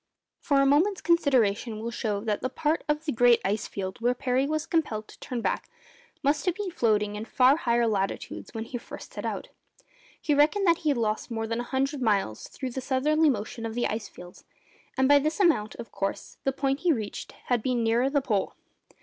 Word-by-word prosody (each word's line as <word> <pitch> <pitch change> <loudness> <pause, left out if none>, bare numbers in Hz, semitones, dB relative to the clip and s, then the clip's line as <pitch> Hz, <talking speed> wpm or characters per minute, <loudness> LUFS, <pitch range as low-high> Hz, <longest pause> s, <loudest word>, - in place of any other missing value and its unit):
For 280 -2 +2
a 275 - +4
moment's 335 +9 +3
consideration 245 -9 +2
will 230 +2 -4
show 210 -3 -2
that 210 -1 -1
the 255 - -1
part 300 +4 0
of 300 +1 0
the 305 - 0
great 240 -1 +5
ice 205 +2 0
field 190 +1 -5
where 245 +1 +2
Parry 255 +2 0
was 310 0 -1
compelled 225 -10 -1
to - - -15
turn 245 -2 -4
back - - -2 0.5
must 290 +5 +1
have 355 - +2
been 405 -2 -4
floating 210 - +1
in 210 - -4
far 255 +3 +4
higher 235 -6 +1
latitudes 195 -3 -2
when 225 - -4
he 245 +2 -6
first - - -10
set - - -4
out. - - -4 0.7
He 300 - 0
reckoned 310 +8 +3
that 335 -2 +4
he 310 - 0
had 280 - +2
lost 215 -2 -1
more 225 -1 -2
than 230 +1 -2
a - - -2
hundred 270 +1 -1
miles 200 - 0
through 260 -2 -6
the 265 - -4
southerly 300 +5 +2
motion 230 -1 -3
of 225 0 -4
the 240 - 0
ice 215 0 -2
field, 180 0 -13 0.6
and 265 0 +4
by 285 +1 +7
this 310 +5 -1
amount, 315 - +2
of 230 - -9
course, 195 - -4
the 270 - +3
point 270 0 -1
he 350 +1 +2
reached 220 -8 -4
had 245 -2 +1
been 245 0 0
nearer 235 +4 +2
the 285 0 +1
Pole. 210 -7 -1
250 Hz, 215 wpm, -27 LUFS, 220-290 Hz, 0.7 s, by